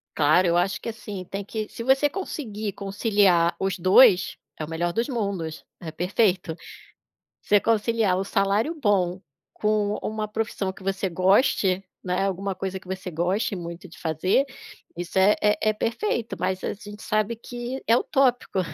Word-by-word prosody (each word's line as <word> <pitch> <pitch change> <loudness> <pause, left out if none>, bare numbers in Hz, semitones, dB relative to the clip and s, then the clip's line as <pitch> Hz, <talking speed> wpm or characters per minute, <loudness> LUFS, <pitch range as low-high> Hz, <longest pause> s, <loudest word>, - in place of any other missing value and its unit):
Claro, 155 +5 +4
eu 170 0 +3
acho 195 +3 0
que - - -4
assim, 210 -4 -7
tem 195 +3 -5
que 215 +1 -4
se 230 - -7
você 270 +3 +4
conseguir 220 - -5
conciliar 195 -4 +2
os 190 0 -1
2, 185 +1 +5 0.2
é 155 - -2
o - - -12
melhor 170 +2 -1
dos 230 +6 -1
mundos, 200 - -3 0.2
é 165 -3 -7
perfeito. 180 0 0 0.9
Você 205 - +4
conciliar 220 -3 +1
o 190 - 0
salário 200 +8 +1
bom 195 - +1 0.3
com 210 -1 +1
uma 215 0 -3
profissão 210 -3 -3
que 190 - -15
você 195 0 -1
goste, 190 +1 +2 0.2
né, 180 +1 0
alguma 195 0 -2
coisa 190 0 -4
que 185 - -19
você 190 -1 -5
goste 185 +6 0
muito 170 0 -7
de 170 - -15
fazer, 175 - +1 0.5
isso 175 +2 -4
é 200 +2 +5
é 210 +1 +2
é - - +2
perfeito. 230 - -2
Mas 185 0 -1
a - - -1
gente 205 0 -11
sabe 215 +2 0
que 240 +3 -6
é 230 - +6
utópico, 250 -6 +1
195 Hz, 165 wpm, -25 LUFS, 185-220 Hz, 0.9 s, é